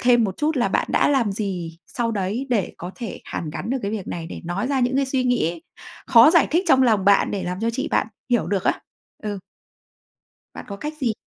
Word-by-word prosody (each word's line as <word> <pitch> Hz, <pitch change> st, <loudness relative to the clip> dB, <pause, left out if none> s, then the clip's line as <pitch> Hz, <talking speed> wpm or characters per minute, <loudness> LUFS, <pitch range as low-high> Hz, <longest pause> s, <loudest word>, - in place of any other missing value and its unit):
thêm 240 Hz, -1 st, +4 dB
một 190 Hz, -3 st, -3 dB
chút 305 Hz, +1 st, 0 dB
là 245 Hz, -, +2 dB
bạn -, -, 0 dB
đã -, -, +3 dB
làm 255 Hz, -8 st, +2 dB
gì 180 Hz, -5 st, -4 dB
sau 235 Hz, -2 st, -2 dB
đấy 210 Hz, +5 st, -2 dB
để 210 Hz, -7 st, 0 dB
có 175 Hz, -, -7 dB
thể 235 Hz, -5 st, -7 dB
hàn 155 Hz, -, -5 dB
gắn 170 Hz, +8 st, -5 dB
được 265 Hz, -, 0 dB
cái 200 Hz, -, -2 dB
việc 210 Hz, -3 st, -4 dB
này, 165 Hz, -1 st, -5 dB
để -, -, -8 dB
nói 175 Hz, +6 st, -2 dB
ra 270 Hz, -1 st, 0 dB
những 250 Hz, +1 st, +1 dB
cái 275 Hz, 0 st, +2 dB
suy 260 Hz, -1 st, 0 dB
nghĩ 175 Hz, -10 st, 0 dB, 0.4 s
khó 240 Hz, +2 st, +8 dB
giải 335 Hz, -1 st, +4 dB
thích 345 Hz, +5 st, +2 dB
trong 265 Hz, -3 st, +6 dB
lòng 220 Hz, -6 st, +3 dB
bạn 200 Hz, 0 st, +4 dB
để 200 Hz, -, -2 dB
làm 180 Hz, +2 st, -4 dB
cho 230 Hz, +1 st, +1 dB
chị 265 Hz, +3 st, -3 dB
bạn -, -, +1 dB, 0.2 s
hiểu 240 Hz, -2 st, +2 dB
được 195 Hz, -2 st, -1 dB
á. -, -, +1 dB, 0.4 s
Ừ. 205 Hz, -2 st, -3 dB, 1.2 s
Bạn -, -, -8 dB
có 200 Hz, -, -6 dB
cách 300 Hz, +8 st, -5 dB
gì? 235 Hz, -4 st, +1 dB
225 Hz, 240 wpm, -22 LUFS, 195-260 Hz, 1.2 s, khó